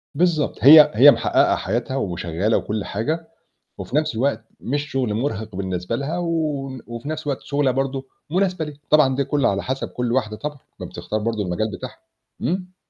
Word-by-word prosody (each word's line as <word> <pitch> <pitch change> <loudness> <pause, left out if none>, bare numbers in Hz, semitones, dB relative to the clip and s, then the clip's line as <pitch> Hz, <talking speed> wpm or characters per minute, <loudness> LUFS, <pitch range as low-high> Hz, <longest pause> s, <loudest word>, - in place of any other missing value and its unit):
بالضبط، 165 -2 +1
هي 150 +2 +10
هي 140 +5 +9
محقَّقة - - +2
حياتها 120 +6 -2
وشغالة 90 0 -1
وكُلّ 105 -1 -3
حاجة، 155 +10 -3 0.5
وفي 130 - -6
نفس 155 -5 +1
الوقت 115 -2 0
مش 145 +4 -3
شغل 125 -5 0
مُرهِق 110 -4 -3
بالنسبة 95 +2 -3
لها 145 +6 -3
و 170 -1 -1 0.6
وفي 120 +5 -7
نفس 155 0 -4
الوقت 140 - -2
شغلانه 140 -2 0
برضه 135 0 -2 0.2
مناسبة 180 -3 0
ليها، 150 -1 -9
طبعًا 145 -4 +5
دي 140 - +1
كلّه 145 -1 +1
على 100 0 -1
حَسَب 130 +1 -3
كُلّ 125 -1 -2
واحدة 110 -4 -1
طبعًا، 145 +5 -5 0.2
ما - - -5
بتختار 110 - -4
برضه 110 0 -2
المجال 100 +4 -2
بتاعها. - - -8 0.4
امم. 180 +5 -2
130 Hz, 175 wpm, -22 LUFS, 110-150 Hz, 0.6 s, هي